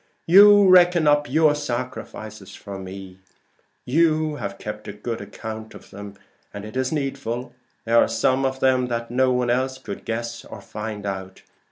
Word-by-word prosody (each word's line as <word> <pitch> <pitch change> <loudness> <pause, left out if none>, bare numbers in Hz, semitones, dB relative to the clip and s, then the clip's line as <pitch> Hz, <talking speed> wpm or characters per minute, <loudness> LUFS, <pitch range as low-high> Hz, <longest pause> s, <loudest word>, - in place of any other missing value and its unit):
"You 205 +3 +8
reckon 175 -2 +6
up 145 0 +3
your 155 +2 +4
sacrifices 120 -7 -6
for 100 -2 -8
me: 95 0 -9 0.7
you 155 +1 +1
have 100 -5 -5
kept 105 0 -7
a 105 - -6
good 110 +2 -5
account 110 +2 -8
of - - -14
them, 100 0 -9 0.4
and 100 0 -8
it 110 - -10
is 130 0 -1
needful: 135 -4 -3 0.3
they 115 - -5
are 115 - +5
some 130 +1 +1
of 130 0 -2
them 130 -1 +2
what 115 -1 -4
no 130 +1 +2
one 125 -1 +1
else 130 +1 -1
could 130 - -8
guess 115 +1 -4
or - - -10
find 105 -1 -7
out. 95 -1 -6
120 Hz, 170 wpm, -23 LUFS, 105-140 Hz, 0.7 s, You